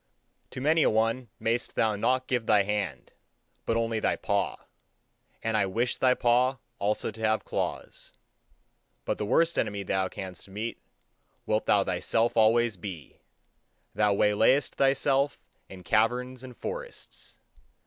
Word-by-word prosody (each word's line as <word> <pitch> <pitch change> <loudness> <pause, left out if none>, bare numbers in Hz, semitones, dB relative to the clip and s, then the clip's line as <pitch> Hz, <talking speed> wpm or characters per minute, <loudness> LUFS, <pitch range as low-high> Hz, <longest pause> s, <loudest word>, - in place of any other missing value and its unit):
To - - -7
many 155 +4 +3
a - - +4
one 115 +2 0
mayest 115 +2 -1
thou 110 -2 +2
not 130 +5 +1
give 120 -4 -1
thy 105 -2 +5
hand, 95 -11 -3 0.6
but 115 - +1
only 115 -1 0
thy - - +1
paw; - - -1 0.9
and 110 0 0
I 100 -2 +2
wish 115 +6 -1
thy 125 -1 +3
paw 125 +2 +2 0.2
also 105 +2 -1
to 110 +1 -11
have 110 0 +1
claws. - - -4 0.9
But - - -2
the 105 - -2
worst 165 +8 +2
enemy 100 -1 -2
thou 95 0 0
canst 95 0 -8
meet, 110 +4 -5 0.6
wilt 110 0 0
thou 100 -1 +4
thyself 115 +6 0
always 115 -1 +3
be; 85 -6 -8 0.7
thou 105 -1 +2
waylayest 110 +8 +3
thyself 135 +1 +2 0.3
in 95 -1 -11
caverns 125 +6 +1
and 125 -2 -11
forests. - - -8
115 Hz, 140 wpm, -28 LUFS, 105-125 Hz, 0.9 s, thy